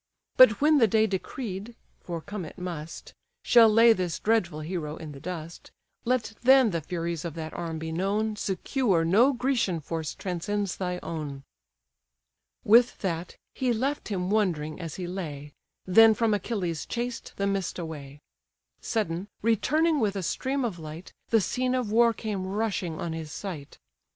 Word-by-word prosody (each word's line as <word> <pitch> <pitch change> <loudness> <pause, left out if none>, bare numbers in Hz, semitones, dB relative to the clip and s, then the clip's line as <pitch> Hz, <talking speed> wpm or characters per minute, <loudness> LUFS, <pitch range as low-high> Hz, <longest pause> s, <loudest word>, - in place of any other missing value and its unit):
But 235 -5 +7
when 300 0 +5
the 230 - +5
day 220 +2 +3
decreed 205 +2 -5 0.2
(for 170 -2 -6
come 200 +2 -6
it 160 - -10
must) 170 -3 -7 0.3
Shall 230 -2 +7
lay 225 +2 +7
this 180 -7 -2
dreadful 180 -8 0
hero 155 -2 -4
in 160 -2 -8
the 140 - -10
dust, 170 0 -7 0.4
Let 235 -3 0
then 260 -2 +6
the 165 -2 -2
furies 170 0 -3
of 170 -3 -5
that 160 -1 -6
arm 165 -1 -4
be 160 0 -5
known, 205 +5 0
Secure 195 -2 0
no 220 +11 +5
Grecian 245 -9 0
force 160 +1 -4
transcends 195 +2 -3
thy 180 -1 -2
own." 145 -4 -5 1.2
With 235 +3 +5
that, 170 -3 -3 0.2
he 255 -2 0
left 270 +6 -2
him 185 -2 -2
wondering 170 -8 0
as 165 -3 -6
he 185 - -5
lay, 150 -6 -6 0.3
Then 220 +4 +7
from 225 0 +2
Achilles 180 -6 -2
chased 240 0 -4
the 200 - 0
mist 195 -2 -1
away: 150 -4 -7 0.6
Sudden, 190 -4 -2 0.2
returning 305 +8 +2
with 205 -4 0
a 195 - -3
stream 265 +8 -1
of 190 -7 -4
light, 155 +2 -9 0.2
The 225 -2 +4
scene 255 +5 0
of 245 -5 -1
war 235 +1 +5
came 210 -4 -4
rushing 195 -5 -2
on 170 -1 -3
his 160 -2 -6
sight. 160 -8 -7
190 Hz, 160 wpm, -27 LUFS, 165-225 Hz, 1.2 s, But